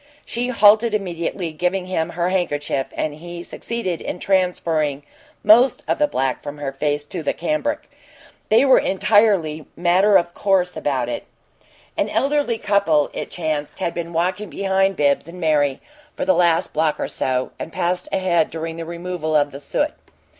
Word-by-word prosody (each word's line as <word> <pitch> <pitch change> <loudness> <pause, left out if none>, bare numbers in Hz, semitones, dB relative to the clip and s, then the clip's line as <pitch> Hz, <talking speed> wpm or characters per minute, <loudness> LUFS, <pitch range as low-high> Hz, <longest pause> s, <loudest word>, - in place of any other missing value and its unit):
She 240 +1 -3
halted 220 -1 +5
immediately, 175 -3 -3
giving 180 +4 -1
him 175 -3 -1
her 175 +1 +1
handkerchief, 145 -7 -1
and 155 - -2
he 175 +3 -8
succeeded 190 -5 -4
in - - -4
transferring 165 -6 0 0.4
most 235 +5 +5
of - - 0
the 295 - +4
black 135 - -1
from 145 0 -7
her 145 -2 -4
face 145 +1 -1
to 170 +3 -6
the 155 - -1
cambric. 300 0 -2 0.6
They 230 +5 +5
were 265 - +6
entirely 195 -6 +2
matter 185 +4 +4
of 175 0 -1
course 185 -2 +1
about 130 -4 -1
it. 120 - -4 0.7
An - - 0
elderly 275 0 +1
couple, 200 -9 +2
it - - -5
chanced, 155 -3 -3
had 170 - -2
been 170 0 -5
walking 180 +4 -1
behind 195 +3 +1
Bibbs 145 0 +1
and 175 +2 -10
Mary 150 -4 +1 0.4
for 280 - -2
the 280 - +4
last 170 -5 +2
block 155 -1 +1
or - - -1
so, 130 -1 -1
and - - -6
passed 180 0 -1
ahead 175 -4 +1
during 165 0 -5
the 165 - -5
removal 170 -2 -3
of 145 -1 +3
the 140 - -8
soot. 295 - -1
175 Hz, 170 wpm, -21 LUFS, 155-200 Hz, 0.7 s, were